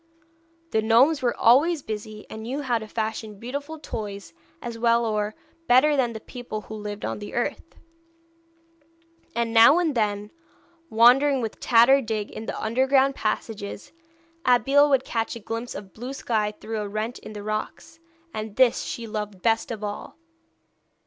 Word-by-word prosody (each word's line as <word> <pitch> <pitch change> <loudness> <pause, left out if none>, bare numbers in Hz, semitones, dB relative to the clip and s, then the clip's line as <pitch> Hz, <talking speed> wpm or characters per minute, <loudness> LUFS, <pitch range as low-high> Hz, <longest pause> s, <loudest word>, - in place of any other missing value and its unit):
The 220 - +2
gnomes 250 +8 +4
were 245 -2 0
always 285 +6 +4
busy, 215 0 -6
and 220 - -8
knew 260 +6 -4
how 245 -4 +1
to 220 - -8
fashion 220 -1 -4
beautiful 285 +8 -6
toys 205 - -7 0.3
as 235 -1 -6
well 235 0 +3
or 215 -1 -1 0.3
better 275 +5 +5
than 245 -4 +1
the 220 - -6
people 240 -2 -7
who 220 - -10
lived 210 -1 -6
on - - -3
the 205 - -8
earth; 275 +7 -3 1.6
and 235 -1 -1
now 230 +7 +8
and 340 -4 +1
then, 210 -3 -1 0.6
wandering 255 +5 +5
with 225 -3 -4
Tad 235 -1 +5
or 275 +1 +6
Dig 215 -3 -3
in 220 - -8
the - - -4
underground 265 +4 +2
passages, 215 -3 -4 0.5
Abeille 270 +4 +4
would 270 -2 +2
catch 225 -1 -2
a - - -7
glimpse 230 +3 -5
of 195 -2 -9
blue 245 +4 -6
sky 215 -6 -1
through 220 0 -4
a 205 - -4
rent 215 +3 -3
in 215 - -10
the 205 -1 -7
rocks, 215 +9 -5 0.3
and 215 -1 -5
this 255 -2 +4
she 235 - -5
loved 210 -4 -5
best 225 0 +2
of 220 -3 -5
all. 205 0 -6
230 Hz, 165 wpm, -25 LUFS, 215-255 Hz, 1.6 s, now